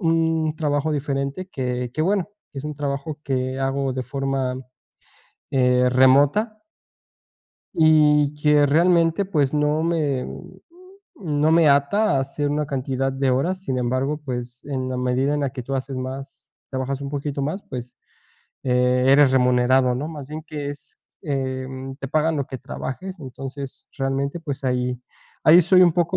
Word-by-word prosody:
un 160 -2 +1
trabajo 150 0 0
diferente 140 +3 -2
que 125 -5 -3
que, 155 - -1
bueno, 195 +2 +1 0.2
que 140 - -7
es 135 - -7
un 150 0 -4
trabajo 145 +1 -4
que 130 -1 -2
hago 135 0 0
de 130 0 -3
forma, 135 -1 -2 0.9
eh, 125 -1 +3
remota 140 - +4 1.2
y 150 -2 +4
que, 150 0 +3
realmente, 170 +4 +3
pues, 150 -7 0
no 150 +1 +1
me, 150 -6 0
mm, - - -10 0.8
no 155 +1 +4
me 165 -2 +5
ata 140 +7 +3
a - - +2
hacer 140 +2 -2
una 150 +1 -1
cantidad 135 -1 -2
de 135 0 0
horas, 175 +9 0
sin 130 -7 -2
embargo, 130 +5 -1
pues, 125 -2 -6
en 130 -2 -3
la 130 - -3
medida 125 +3 0
en 145 - -1
la 140 - -1
que 125 -1 -6
tú 135 +3 -4
haces 135 0 -3
más, 130 +2 -7 0.2
trabajas 135 +1 -3
un 140 -1 -5
poquito 140 0 -3
más, 155 +8 -3
pues, 125 -2 -7 0.7
eh, 125 0 +2
eres 140 0 +6
remunerado, 125 0 +3
¿no?, 140 +5 -3
más 150 -4 -8
bien 155 +2 -7
que 150 -3 -5
es, 145 -2 -10 0.2
em, 130 -3 -4
te 135 -1 -6
pagan 155 +2 +1
lo 140 -2 -2
que 130 - -7
trabajes, 185 +11 -6
entonces 135 0 -8
realmente, 140 +3 -2
pues, 140 -4 -5
ahí 125 -1 -1 0.4
ahí 165 +3 +8
soy 185 +2 +5
un 175 -2 +5
poco 175 +2 +1
140 Hz, 165 wpm, -22 LUFS, 130-155 Hz, 1.2 s, ahí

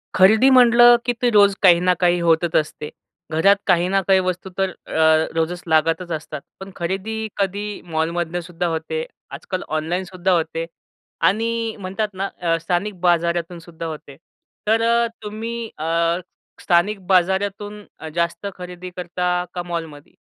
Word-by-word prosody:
खरेदी 215 +7 +6
म्हटलं, 240 -1 +7
की 245 - +1
ते 245 - +3
रोज 200 -1 +6
काही 175 -3 +6
ना 180 +1 +3
काही 175 0 +4
होतच 165 0 +2
असते. 150 -1 -1 0.4
घरात 165 +6 +4
काही 175 -2 +3
ना 195 0 +2
काही 190 -1 +5
वस्तू 185 0 -3
तर 195 0 +1 0.2
अ, 160 0 +3
रोजच 165 +2 -1
लागतच 165 +2 +1
असतात. 155 -3 -5 0.2
पण 190 0 -9
खरेदी 190 +5 -3 0.2
कधी 200 0 -1 0.3
मॉलमधनंसुद्धा 170 +2 -2
होते. 160 0 -3 0.3
आजकाल 175 +6 -5
ऑनलाईनसुद्धा 180 +3 -2
होते 165 -1 0 0.6
आणि 225 +4 -1 0.3
म्हणतात 195 +3 -2
ना 195 +1 -3
अ, 165 -1 +1
स्थानिक 185 +2 -2
बाजारातूनसुद्धा 170 -1 -1
होते 150 -3 -8 0.5
तर 225 +1 +3
अ, 235 +1 +3 0.2
तुम्ही 225 +3 -5 0.2
अ, 155 - -5 0.8
स्थानिक 190 +4 +2
बाजारातून 195 +3 0 0.3
जास्त 170 +2 -1
खरेदी 180 0 -8
करता 180 0 -3 0.3
का 175 - -3
मॉलमध्ये? 165 -4 -7
180 Hz, 135 wpm, -21 LUFS, 165-195 Hz, 0.8 s, म्हटलं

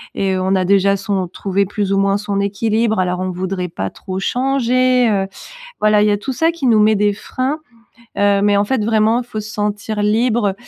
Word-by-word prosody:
et 190 -1 0
on 190 +1 0
a 185 -1 +1
déjà 200 +1 +3
son 195 -2 -2
trouvé 195 +2 -1
plus 200 0 -2
ou 195 - +2
moins 195 0 +2
son 205 -1 -3
équilibre 220 +1 0
alors 180 0 0
on 185 - -2
voudrait 185 0 -3
pas 95 -10 -4
trop 185 - -6
changer, 255 +1 +1
heu. 195 -2 0 0.5
Voilà 215 0 +4
il 210 - +3
y 210 - +3
a - - +2
tout 235 +6 -5
ça 325 +6 +1
qui 330 -5 -3
nous 225 -2 +4
met 215 +1 +4
des 205 0 +2
freins, 260 +8 -3 0.6
heu, 200 0 +3
mais 205 0 +3
en 200 - +2
fait 220 0 -1
vraiment 220 +1 +2
il - - -17
faut 215 -3 -5
se 215 0 -8
sentir 210 0 -3
libre, 215 -1 +1
205 Hz, 220 wpm, -17 LUFS, 195-225 Hz, 0.6 s, Voilà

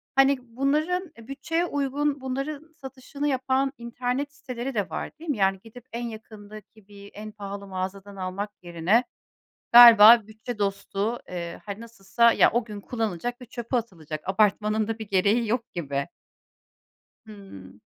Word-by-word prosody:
Hani, 270 0 +5
bunların 295 +9 -1
bütçeye 275 +8 -3
uygun, 285 -2 -1
bunların 280 +4 -5
satışını 275 +1 -6
yapan 265 0 0
internet 250 +4 -3
siteleri 255 -2 -6
de 205 -3 -1
var, - - -5
değil 330 0 -9
mi? 260 - -3
Yani, 195 -1 +2
gidip 230 +2 -14
en 235 +1 -4
yakındaki 215 -1 -12
bir 200 0 -13
en 215 +1 -8
pahalı 200 -1 -8
mağazadan 190 +1 -6
almak 190 +2 -4
yerine 175 +7 +1 0.7
galiba 230 -2 +10
bütçe 220 +2 -8
dostu, 200 +3 -2
eee, 170 -2 -6
hani, 200 0 -6
nasılsa 230 +1 +2
ya, - - +5
o 240 0 +1
gün 210 -2 -8
kullanılacak 225 +2 -3
ve 250 - -10
çöpe 240 +1 -4
atılacak. 165 -9 -5
Abartmanın 210 +2 +2
da 225 0 -3
bir 220 -2 -8
gereği 210 +4 +2
yok 235 0 -2
gibi. 140 -2 -3 1.2
Hıı. 105 - -13
225 Hz, 145 wpm, -25 LUFS, 200-260 Hz, 1.2 s, galiba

